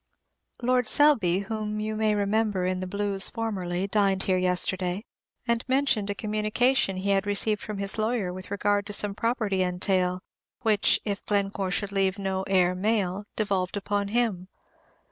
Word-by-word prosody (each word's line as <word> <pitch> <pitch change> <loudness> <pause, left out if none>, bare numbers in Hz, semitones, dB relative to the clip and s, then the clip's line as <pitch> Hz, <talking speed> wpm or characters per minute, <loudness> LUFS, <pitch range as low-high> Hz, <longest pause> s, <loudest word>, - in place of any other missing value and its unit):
Lord 250 -1 +2
Selby, 220 - +3
whom 215 0 -3
you 215 0 -2
may 215 -1 +1
remember 205 -2 +1
in 185 0 -1
the 185 - -4
Blues 200 0 -1
formerly, 195 -6 -2
dined 195 -2 +1
here 185 -1 +1
yesterday, 180 +2 0 0.4
and 235 0 +1
mentioned 260 -6 +1
a 205 - -1
communication 215 +1 +1
he 200 +2 0
had 195 0 +1
received 205 +1 0
from 210 -1 -5
his 200 +2 -1
lawyer 215 -5 0
with 185 +1 -9
regard 200 0 0
to 205 - -5
some 205 0 -1
property 215 -3 0
entail, 180 0 0 0.4
which, 215 -4 +3
if 205 -2 -3
Glencore 200 -2 0
should 200 +2 -2
leave 195 -1 +1
no 190 -1 -2
heir 180 -2 +3
male, 200 0 0
devolved 195 -3 -1
upon 205 0 -1
him. 210 -5 0
200 Hz, 160 wpm, -27 LUFS, 190-215 Hz, 0.4 s, Selby